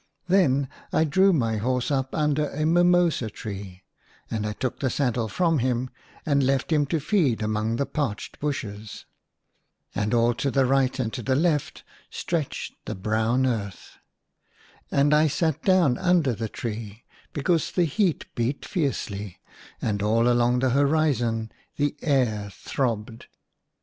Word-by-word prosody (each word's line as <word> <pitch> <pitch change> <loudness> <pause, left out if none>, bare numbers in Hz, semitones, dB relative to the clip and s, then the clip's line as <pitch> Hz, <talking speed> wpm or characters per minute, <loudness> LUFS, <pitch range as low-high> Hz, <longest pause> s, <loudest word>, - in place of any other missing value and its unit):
Then 145 -8 +3 0.2
I - - +3
drew 190 +6 +4
my 115 -9 +1
horse 125 +5 -1
up 135 -1 -1
under 150 -1 +1
a 155 +2 -2
mimosa 175 -6 +3
tree, 100 -4 -8 0.5
and 110 -1 -2
I 105 - -3
took 130 +3 -3
the 130 - 0
saddle 120 -3 0
from 165 - +1
him 125 0 -1 0.3
and 140 -2 +2
left 135 +3 0
him 150 -2 +3
to 165 +2 0
feed 150 - +1
among 110 +1 -1
the 140 - 0
parched 135 -10 -4
bushes. 110 -8 -5 0.9
And 105 +1 -1
all 120 0 +3
to 140 - -1 0.2
right 135 0 +2
and 115 -4 -2
to 130 0 -1
left 150 -1 0 0.3
stretched 165 -5 -3
the - - -4
brown 110 +6 +1
earth. 105 -7 -4 0.9
And 145 +2 +3
I 155 +1 +5
sat 160 0 0
down 180 -10 +3
under 180 -8 +3
the 110 0 -4
tree, 110 -1 -6 0.3
because 160 +3 0
the 180 - +2
heat 170 +2 0
beat 120 +4 -2
fiercely, 105 - -3 0.4
and 105 -2 -1
all 115 +3 +2
along 120 0 +3
the 130 -1 +2
horizon 135 -6 +1 0.2
the 145 0 0
air 120 -9 +1
throbbed. 115 -1 -3
130 Hz, 145 wpm, -25 LUFS, 110-150 Hz, 0.9 s, I